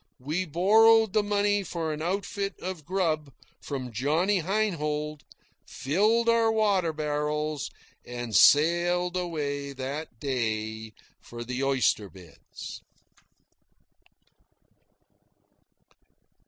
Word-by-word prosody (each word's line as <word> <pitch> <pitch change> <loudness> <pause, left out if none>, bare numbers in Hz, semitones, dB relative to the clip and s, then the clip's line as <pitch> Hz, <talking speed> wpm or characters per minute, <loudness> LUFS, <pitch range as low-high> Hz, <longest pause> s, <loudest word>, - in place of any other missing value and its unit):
We 155 +8 -2
borrowed 220 +6 +5
the 215 - +4
money 205 0 +1
for 165 -4 -3
an 150 - -6
outfit 195 +3 -3
of 180 -5 -6
grub 160 -6 -1 0.3
from 130 -4 -5
Johnny 160 - +1
Heinhold, 155 -6 -1 0.5
filled 215 - +1
our 230 -1 +4
water 200 -6 +2
barrels, 150 -1 -2 0.3
and 120 -3 -5
sailed 175 +3 +4
away 145 -5 -3
that 135 -1 -6
day 110 -4 -3 0.3
for 120 0 -8
the 125 +2 -3
oyster 130 -6 +1
beds. 90 -6 -11
155 Hz, 90 wpm, -27 LUFS, 140-190 Hz, 0.5 s, borrowed